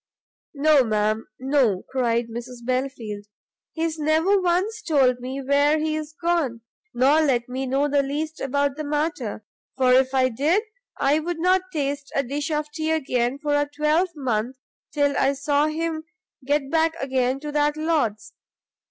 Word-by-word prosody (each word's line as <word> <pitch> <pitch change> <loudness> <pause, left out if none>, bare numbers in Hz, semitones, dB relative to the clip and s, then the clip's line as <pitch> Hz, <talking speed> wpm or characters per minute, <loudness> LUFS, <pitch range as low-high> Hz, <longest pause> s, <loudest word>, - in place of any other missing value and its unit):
"No, 290 -1 +5
ma'am, 215 0 0
no," 260 -8 +1
cried 235 -3 0
Mrs 240 +1 -8
Belfield, 250 -5 -3 0.5
"he's 325 -1 -2
never 320 +6 +2
once 370 +5 0
told 270 -9 +2
me 260 +2 -5
where 285 +3 +3
he 310 0 -1
is 310 0 -5
gone, 335 -9 0 0.3
nor 275 +6 +4
let 250 -6 +1
me 260 +1 -4
know 275 +3 +1
the 285 0 +2
least 305 +3 -4
about 280 +1 0
the 310 - -3
matter, 290 -8 -2 0.3
for 255 -1 +4
if 260 +1 +3
I 255 -1 +3
did 305 - +1 0.3
I 285 +3 +2
would 345 +2 -3
not 365 +3 +3
taste 285 -3 -3
a 275 - +2
dish 285 +4 -3
of 300 -1 -2
tea 315 0 -3
again 260 -5 0
for 295 0 -2
a 290 0 +1
twelvemonth 290 - 0 0.4
till 285 -2 +1
I 270 +1 +2
saw 290 +1 +1
him 315 0 -3 0.4
get 285 -1 0
back 325 0 +2
again 260 -1 0
to 300 -1 -5
that 295 0 +1
lord's! 310 -10 -1
285 Hz, 160 wpm, -23 LUFS, 255-310 Hz, 0.5 s, No